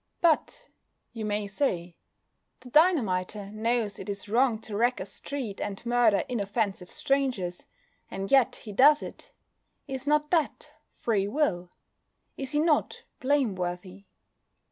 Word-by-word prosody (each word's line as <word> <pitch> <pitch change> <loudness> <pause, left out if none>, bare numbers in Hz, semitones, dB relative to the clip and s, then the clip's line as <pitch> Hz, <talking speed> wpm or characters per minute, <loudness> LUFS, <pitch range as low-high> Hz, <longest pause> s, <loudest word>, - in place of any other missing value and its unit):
"But," 340 +9 +1 0.5
you 225 -2 -4
may 210 0 -1
say, 180 - -2 0.7
"the 250 -1 -13
dynamiter 210 - +2
knows 220 -1 -1
it - - -7
is 200 0 -4
wrong 235 +2 +3
to 215 - -6
wreck 240 +4 +2
a 185 - -4
street 235 0 -5
and 205 +2 -5
murder 235 -4 +3
inoffensive 200 -5 -2
strangers, 250 -11 -1 0.4
and 195 0 -5
yet 270 -3 +5
he 215 - -9
does 290 +8 +6
it. - - -10 0.6
Is 270 0 -5
not 300 0 +2
that 325 -4 0 0.3
free 205 -4 0
will? 205 - 0 0.7
Is 270 0 -5
he 295 - +3
not 310 -2 +1 0.2
blameworthy?" 195 -8 -1
225 Hz, 130 wpm, -28 LUFS, 195-275 Hz, 0.7 s, does